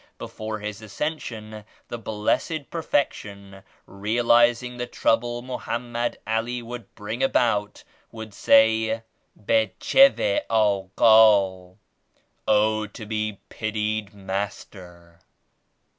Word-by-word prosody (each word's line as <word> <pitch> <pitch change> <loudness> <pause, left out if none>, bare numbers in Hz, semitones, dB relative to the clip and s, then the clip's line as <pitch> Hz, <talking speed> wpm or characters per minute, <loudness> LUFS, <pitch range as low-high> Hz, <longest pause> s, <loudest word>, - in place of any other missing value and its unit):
Before 110 0 -6
His 105 0 -7
Ascension, 110 -3 -5 0.3
the 120 - -5
Blessed 115 +8 -2
Perfection 100 -11 -3 0.2
realizing 120 +4 +2
the 125 0 -4
trouble 120 0 0
Mohammed 120 -1 -4
Ali 115 +3 -2
would 120 -2 -9
bring 110 +3 -6
about, 105 -6 +1 0.3
would 110 -2 -9
say 110 +1 +3 0.4
"Becheveh 110 - +3
Aghal" 100 -2 +3 0.7
("O 110 0 +2
to 105 +1 -10
be 110 -1 -3
pitied 110 -1 -3
Master!") 95 -3 -7
110 Hz, 85 wpm, -24 LUFS, 105-120 Hz, 0.7 s, say